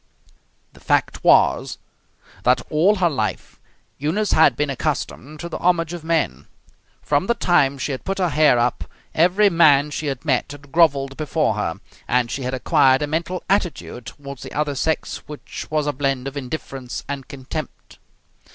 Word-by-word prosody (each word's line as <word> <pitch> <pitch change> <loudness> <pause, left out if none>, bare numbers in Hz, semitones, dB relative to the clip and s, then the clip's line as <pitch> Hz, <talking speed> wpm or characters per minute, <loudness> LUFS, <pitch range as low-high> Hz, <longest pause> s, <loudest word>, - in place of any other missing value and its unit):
The - - -17
fact - - 0
was - - +4 0.6
that, 125 0 +3
all 175 +8 +4
her 185 -3 +2
life, 145 - -3 0.4
Eunice 180 +9 0
had 160 +1 +5
been 150 -1 -1
accustomed 150 +1 -3
to 170 - -5
the - - -6
homage 175 -2 +1
of 175 -2 -7
men. 155 - -1 0.6
From 145 +5 +1
the 235 - +2
time 140 -9 +2
she 140 - -3
had 130 - -5
put 195 0 -3
her 180 -2 +1
hair 150 -4 +4
up 120 +1 0 0.3
every 180 +6 +4
man 150 -4 +5
she 150 +1 -3
had 135 +1 -4
met 135 -1 0
had 145 -1 -14
grovelled 140 -5 +3
before 155 -4 0
her, 100 -6 -3 0.3
and 125 -1 +1
she 135 - -3
had 130 0 -2
acquired 130 +2 +3
a - - +1
mental 170 +4 -3
attitude 175 - -2
toward 140 -2 -9
the - - -9
other 150 -1 -1
sex 160 +4 -1
which 150 -1 -8
was 155 -1 0
a 145 - 0
blend 135 -1 -1
of 135 - -6
indifference 135 -2 -6
and 140 -2 -5
contempt. 140 +2 -8
145 Hz, 170 wpm, -21 LUFS, 135-165 Hz, 0.6 s, had